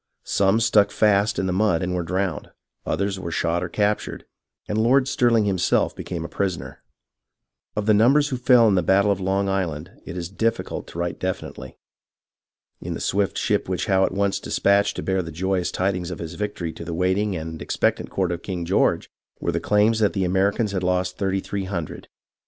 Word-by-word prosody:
Some 100 +2 +2
stuck 110 -3 +4
fast 105 0 +2
in - - 0
the 95 - 0
mud 95 -3 +2
and 90 0 -2
were 90 - 0
drowned, 90 -1 -2 0.4
others 100 -1 -1
were 90 -2 -5
shot 85 +1 0
or 90 - -4
captured, 105 +3 -1 0.4
and 105 - -1
Lord 130 +4 +4
Stirhng 120 -5 +3
himself 95 -3 +1
became 85 -2 -5
a - - -4
prisoner. 95 -3 -3 0.9
Of 105 - -1
the 110 - +4
numbers 135 +8 +4
who 130 - -2
fell 125 -2 +5
in 105 - +3
the 90 - +3
battle 100 +4 +3
of 100 - 0
Long 95 +1 0
Island, 90 -3 -2
it 90 - -7
is 85 -2 -3
difficult 115 +5 -2
to - - -10
write 85 0 -3
definitely. 95 0 -5 1.0
In - - -4
the - - -5
swift 100 0 0
ship - - 0
which - - -1
Howe 95 -1 +3
at - - +1
once 100 0 0
despatched 100 +1 +2
to - - -4
bear 95 0 0
the 85 -2 -7
joyous 95 +2 -1
tidings 90 -2 -1
of 90 - -5
his 85 0 -6
victory 90 -4 -4
to - - -8
the 85 - -5
waiting 95 +3 +1
and 80 -1 -6
expectant - - 0
court 95 -2 -1
of 85 -1 -4
King 90 -3 -4
George, 95 +4 +1 0.3
were - - -1
claims 105 +2 +2
that 105 -2 +2
the 95 -2 0
Americans 100 +4 +1
had 95 -2 -2
lost 90 0 -1
thirty 95 -1 0
three 100 0 -4
hundred. 90 -5 -5
95 Hz, 200 wpm, -23 LUFS, 90-105 Hz, 1.0 s, fell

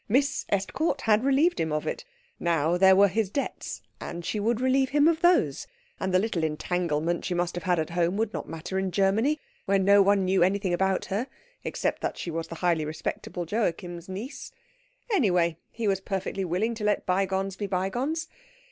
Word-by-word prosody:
Miss 275 +4 +1
Estcourt 270 - 0
had 220 +1 +3
relieved 285 +6 +3
him 160 - 0
of 150 0 -1
it. - - -4 0.3
Now 165 -1 +1
there 190 +1 +6
were 200 +1 +6
his 205 +1 0
debts, 280 +7 -4 0.2
and 170 0 -6
she 210 - -2
would 225 +2 +1
relieve 260 +1 +2
him 290 +2 +4
of 330 0 +2
those; 350 0 +3 0.3
and 190 - -1
the 185 - +4
little 185 -4 0
entanglement 165 +1 -1
she 180 - -2
must 175 0 0
have 175 - -6
had 180 -1 +2
at 160 +1 -2
home 175 +2 +1
would 220 0 -1
not - - -5
matter 165 +4 -4
in 190 0 -1
Germany, 210 - +2 0.3
where 195 0 +3
no 200 +1 +5
one 195 -1 +3
knew 185 0 +2
anything 190 +1 +2
about 190 +1 +1
her, 210 +7 -2 0.4
except - - -2
that - - -2
she 170 - -4
was 165 0 -3
the 165 - -7
highly 170 -3 +2
respectable 155 +3 -4
Joachim's 175 -3 -2
niece. 210 +9 -6 0.6
Anyway, 180 - +2
he 225 -2 -3
was 195 -1 +1
perfectly 195 0 -3
willing 185 +7 0
to 220 -2 -6
let 210 0 +1
bygones 195 0 0
be 205 +1 -4
bygones. 245 - -1
195 Hz, 190 wpm, -27 LUFS, 175-225 Hz, 0.6 s, there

